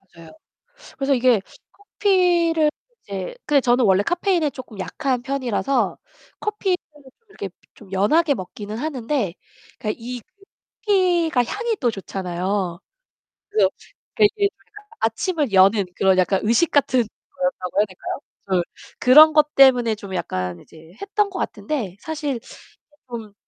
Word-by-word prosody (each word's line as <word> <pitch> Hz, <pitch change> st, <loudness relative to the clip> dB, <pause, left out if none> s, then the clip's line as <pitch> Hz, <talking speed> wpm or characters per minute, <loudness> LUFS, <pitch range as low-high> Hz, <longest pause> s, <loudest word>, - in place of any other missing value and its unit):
맞아요. 165 Hz, -1 st, -13 dB, 0.7 s
그래서 275 Hz, 0 st, +1 dB
이게 245 Hz, -4 st, +3 dB, 0.3 s
커피를 355 Hz, -5 st, +2 dB, 0.3 s
이제 195 Hz, -2 st, -5 dB
근데 290 Hz, -2 st, +4 dB
저는 245 Hz, -1 st, +3 dB
원래 195 Hz, 0 st, +4 dB
카페인에 350 Hz, -, +1 dB
쪼끔 250 Hz, -6 st, -11 dB
약한 250 Hz, +6 st, -2 dB
편이라서 270 Hz, 0 st, -1 dB, 0.4 s
커피를 410 Hz, -3 st, 0 dB, 0.5 s
이렇게 200 Hz, -, -6 dB, 0.3 s
좀 205 Hz, -4 st, -16 dB
연하게 285 Hz, -, +3 dB
먹기는 205 Hz, +2 st, -7 dB
하는데 250 Hz, -, -2 dB, 0.4 s
그러니까 215 Hz, -, -3 dB
이 245 Hz, +1 st, -6 dB, 0.6 s
커피가 350 Hz, -, +2 dB
향이 445 Hz, -, -2 dB
또 245 Hz, -4 st, +2 dB
좋잖아요. 185 Hz, -2 st, -3 dB, 0.7 s
그래서 435 Hz, +1 st, +3 dB, 0.5 s
그게 420 Hz, -, +6 dB
이게 405 Hz, -1 st, +2 dB
제가 420 Hz, +1 st, -18 dB, 0.2 s
아침을 285 Hz, -, 0 dB
여는 195 Hz, +2 st, +5 dB
그런 190 Hz, -1 st, +3 dB
약간 185 Hz, +1 st, +2 dB
의식 235 Hz, +10 st, +2 dB
같은 260 Hz, -3 st, +3 dB
거였다고 220 Hz, -5 st, -4 dB
해야 210 Hz, -, +4 dB
될까요? 190 Hz, +5 st, -6 dB, 0.3 s
그래서 185 Hz, -3 st, +1 dB, 0.4 s
그런 305 Hz, +5 st, +8 dB
것 300 Hz, 0 st, +3 dB
때문에 245 Hz, -5 st, +6 dB
좀 200 Hz, -3 st, -8 dB
약간 90 Hz, -, -3 dB
이제 160 Hz, +1 st, -17 dB
했던 410 Hz, +1 st, 0 dB
것 380 Hz, -, -6 dB
같은데 235 Hz, -, -3 dB
사실 300 Hz, -2 st, -3 dB
이게 -, -, -12 dB, 0.7 s
좀 225 Hz, -4 st, -7 dB
250 Hz, 300 characters per minute, -22 LUFS, 200-315 Hz, 0.7 s, 그런